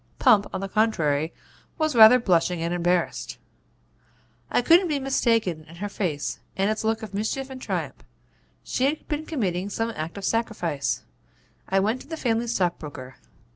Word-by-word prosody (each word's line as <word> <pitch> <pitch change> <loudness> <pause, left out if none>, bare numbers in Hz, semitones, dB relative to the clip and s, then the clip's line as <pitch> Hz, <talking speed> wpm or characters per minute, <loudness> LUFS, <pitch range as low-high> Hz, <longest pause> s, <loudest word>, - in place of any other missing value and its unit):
Pump, 215 -6 +5
on - - -4
the 195 - -3
contrary, 165 -8 +1 0.5
was 310 -3 0
rather 225 +2 +9
blushing 180 -6 +1
and 170 +1 -1
embarrassed. 175 0 -1 1.1
'I - - +1
couldn't 345 +7 +5
be 300 -3 0
mistaken 230 - +1
in 165 - -12
her 205 +4 -4
face 165 -8 -3 0.2
and 195 +2 +2
its 215 +1 -3
look 220 0 0
of 210 -3 -8
mischief 260 +6 -2
and 260 -1 -8
triumph. - - -4 0.6
She 255 - -1
had 295 +3 -1
been 305 +1 -3
committing 195 - -2
some 225 +3 -2
act 160 +5 -5
of 200 - -5
sacrifice. 180 - -1 0.7
I 195 - +3
went 220 +6 0
to - - -14
the 320 +1 -5
family 235 -4 0
stockbroker. 150 - -3
215 Hz, 165 wpm, -25 LUFS, 175-245 Hz, 1.1 s, rather